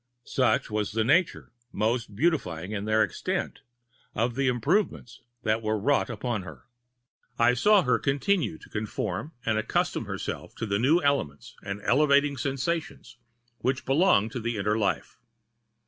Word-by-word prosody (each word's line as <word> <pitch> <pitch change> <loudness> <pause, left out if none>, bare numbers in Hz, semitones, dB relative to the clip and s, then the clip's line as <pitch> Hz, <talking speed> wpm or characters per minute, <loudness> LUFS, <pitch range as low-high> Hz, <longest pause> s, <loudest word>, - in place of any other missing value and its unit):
Such - - +1
was 105 -1 -1
the 110 0 +1
nature—most 120 - -1
beautifying 100 - 0
in 105 -1 -3
their 110 0 +3
extent—of 120 - -4
the 135 +2 0
improvements 130 - 0 0.2
that 110 0 +1
were 110 0 0
wrought 135 +6 +1
upon 115 -1 -3
her. 80 -4 -11 0.7
I 120 - +4
saw 205 +10 +4
her 125 - +2
continue 140 - 0
to - - -16
conform 105 - -4
and 110 -1 +1
accustom 110 - -1
herself - - -5
to - - -4
the 100 -1 0
new 150 +8 +3
elements 110 - -1
and 100 +1 -6
elevating 140 +1 +3
sensations 135 -1 -3 0.4
which 130 +2 -1
belong 135 - +3
to 120 - -5
the 115 0 -2
inner 105 +1 0
life. 95 - -2
120 Hz, 140 wpm, -27 LUFS, 105-140 Hz, 0.7 s, I